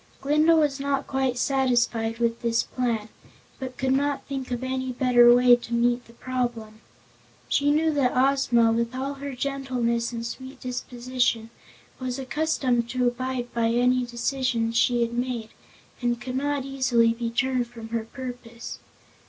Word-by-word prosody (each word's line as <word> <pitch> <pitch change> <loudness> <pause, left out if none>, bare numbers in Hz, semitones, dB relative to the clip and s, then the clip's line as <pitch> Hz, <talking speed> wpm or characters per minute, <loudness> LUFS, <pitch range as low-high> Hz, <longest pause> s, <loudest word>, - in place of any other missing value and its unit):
Glinda 305 +4 +4
was 295 -3 +2
not 275 0 -1
quite 265 -2 -1
satisfied 240 -4 +1
with 235 0 0
this 230 -1 +1
plan, 230 -4 -2 0.5
but 260 -2 -6
could 265 -1 0
not 280 +1 0
think 270 -2 -5
of 245 0 -3
any 260 0 -2
better 245 -1 +5
way 245 0 +7
to 235 -1 -5
meet 240 +1 +1
the 230 - -17
problem. 235 -3 -4 0.7
She 285 0 +2
knew 310 +2 +2
that 260 -4 +1
Ozma, 255 -4 +3
with 235 +2 -1
all 270 +2 -2
her 280 -1 -6
gentleness 250 -3 -1
and 230 -1 -5
sweet 260 +3 -7
disposition, 245 -2 -2 0.5
was 255 -1 -3
accustomed 260 -3 0
to 250 0 +1
abide 245 0 -3
by 230 -1 +1
any 250 +2 +2
decision 240 -1 -1
she 240 +1 +2
had 235 0 -3
made 240 -2 -2 0.5
and 240 -1 0
could 250 +1 -5
not 285 0 -1
easily 250 -4 +2
be 230 0 -3
turned 255 +1 0
from 230 -1 -10
her 225 -1 -2
purpose. 245 -2 -8
250 Hz, 155 wpm, -25 LUFS, 235-265 Hz, 0.7 s, way